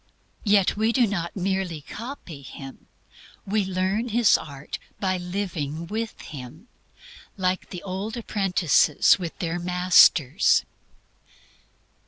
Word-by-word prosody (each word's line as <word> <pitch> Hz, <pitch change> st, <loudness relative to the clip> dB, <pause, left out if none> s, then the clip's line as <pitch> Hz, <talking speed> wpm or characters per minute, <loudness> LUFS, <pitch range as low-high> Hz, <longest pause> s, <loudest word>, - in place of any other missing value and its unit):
Yet 200 Hz, -3 st, +3 dB
we 220 Hz, +2 st, +2 dB
do 245 Hz, 0 st, +3 dB
not 175 Hz, -5 st, -3 dB
merely 190 Hz, -4 st, -2 dB
copy 210 Hz, -, -8 dB
Him. 135 Hz, 0 st, -11 dB, 0.6 s
We 205 Hz, +1 st, +1 dB
learn 190 Hz, +5 st, -1 dB
His 230 Hz, 0 st, +4 dB
art 140 Hz, -1 st, -6 dB, 0.2 s
by 185 Hz, -2 st, 0 dB
living 175 Hz, -4 st, -4 dB
with 220 Hz, +5 st, -4 dB
Him, 150 Hz, -, -10 dB, 0.7 s
like 185 Hz, -1 st, -1 dB
the 180 Hz, -, -8 dB
old 200 Hz, +4 st, -4 dB
apprentices 180 Hz, -, +3 dB
with 170 Hz, -3 st, -5 dB
their 170 Hz, 0 st, -2 dB
masters. 180 Hz, -3 st, +4 dB
185 Hz, 110 wpm, -25 LUFS, 165-205 Hz, 0.7 s, His